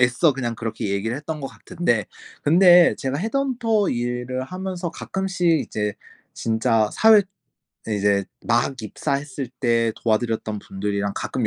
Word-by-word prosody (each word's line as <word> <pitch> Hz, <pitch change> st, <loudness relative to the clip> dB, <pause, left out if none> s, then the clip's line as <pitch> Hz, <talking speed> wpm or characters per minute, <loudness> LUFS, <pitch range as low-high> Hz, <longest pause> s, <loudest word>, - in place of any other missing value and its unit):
애써 125 Hz, +5 st, +4 dB
그냥 120 Hz, -3 st, -2 dB
그렇게 110 Hz, -2 st, -4 dB
얘기를 110 Hz, +5 st, -1 dB
했던 150 Hz, +1 st, -5 dB
것 135 Hz, -, -4 dB
같은데 120 Hz, -, -1 dB, 0.4 s
근데 175 Hz, +2 st, +6 dB
제가 135 Hz, +2 st, -2 dB
헤드헌터 230 Hz, -2 st, 0 dB
일을 125 Hz, +1 st, -2 dB
하면서 185 Hz, +1 st, -5 dB
가끔씩 190 Hz, -1 st, -2 dB
이제 105 Hz, -1 st, -3 dB, 0.4 s
진짜 110 Hz, -1 st, +1 dB
사회 220 Hz, -2 st, +6 dB, 0.7 s
이제 100 Hz, -2 st, +1 dB, 0.2 s
막 120 Hz, +3 st, +2 dB
입사했을 140 Hz, +4 st, -3 dB
때 115 Hz, -2 st, +2 dB
도와드렸던 110 Hz, -1 st, -1 dB
분들이랑 100 Hz, +1 st, -3 dB
가끔 125 Hz, -4 st, -2 dB
125 Hz, 300 characters per minute, -23 LUFS, 110-175 Hz, 0.7 s, 근데